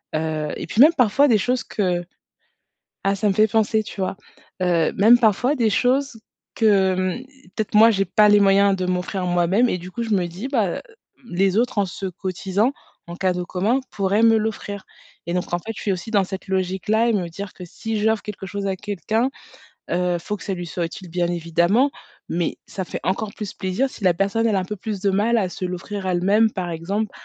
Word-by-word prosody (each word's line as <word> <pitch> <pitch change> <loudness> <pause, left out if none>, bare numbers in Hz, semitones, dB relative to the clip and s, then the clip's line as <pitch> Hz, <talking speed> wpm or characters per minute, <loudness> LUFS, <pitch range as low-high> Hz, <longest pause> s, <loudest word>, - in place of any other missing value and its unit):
heu 155 -1 -2
et - - -5
puis 225 - +2
même, 310 +4 +8
parfois, 250 +4 +4
des 230 -5 +4
choses 250 +5 0
que 180 -4 -1 1.0
Ah, 195 0 +2
ça 210 +1 +1
me - - +3
fait 215 +2 +5
penser, 220 +1 +2
tu 200 - -8
vois, 190 0 -2 0.5
heu, 170 -3 +2
même 225 +5 +6
parfois 240 +4 +2
des 230 -4 +2
choses 255 +1 +1 0.3
que, 225 - +1
hem, 190 +2 +2 0.3
peut-être 215 -1 -3
moi 220 +2 +8
j'ai 195 -3 +1
pas 210 -1 +4
les 205 0 +6
moyens 200 0 +4
de 185 - -2
m'offrir 180 +1 -2
moi-même 175 +7 +2
et 180 - -1
du 180 +1 -9
coup 235 +5 -4
je 230 - -4
me 190 -4 +2
dis, 180 +9 -6
bah, 230 -8 +1
heu, - - -3
hem, - - -7 0.5
les 190 +3 +2
autres 245 0 0
en 200 - +4
se 190 +2 -6
cotisant 190 +5 -1 0.3
en 170 - -7
cadeau 180 -1 0
commun, 210 +10 0
pourraient 200 +2 +1
me 225 -1 +6
l'offrir. 205 -2 -4 0.4
Et 170 - -2
donc 180 -1 -3
en 175 - +1
fait, 225 +6 -6
je - - -7
suis 200 - 0
aussi 185 +4 -5
dans 200 -3 +3
cette 190 +1 -7
logique-là 190 +5 0
et - - +3
me 185 -5 -1
dire 195 +3 -7
que 180 - -9
si 220 +5 -4
j'offre 220 0 +1
quelque 205 -2 -7
chose 200 +1 -4
à 195 - 0
quelqu'un, 210 - -1 0.6
heu, 180 0 0
faut 205 +5 -4
que - - -13
ça 195 - -2
lui 175 -1 -6
soit 170 +1 -3
utile, 180 +2 -10
bien 175 0 0
évidemment, 175 - +2 0.4
mais 170 0 -2
ça 190 - -5
fait - - -6
encore 200 +3 -1
plus 210 -3 -6
plaisir 190 +9 -1
si 210 - -10
la 180 - +5
personne 200 +5 0
elle 220 - +2
a - - +2
un - - -3
peu 210 - -5
plus 205 0 -5
de 200 - +1
mal 215 +5 +2
à 195 -4 0
se 180 - -6
l'offrir 190 +2 -5
à 185 - +1
elle 175 - 0
même, 215 +3 +4
par 185 -3 -3
exemple, 195 +6 -2
195 Hz, 230 wpm, -22 LUFS, 180-220 Hz, 1.0 s, même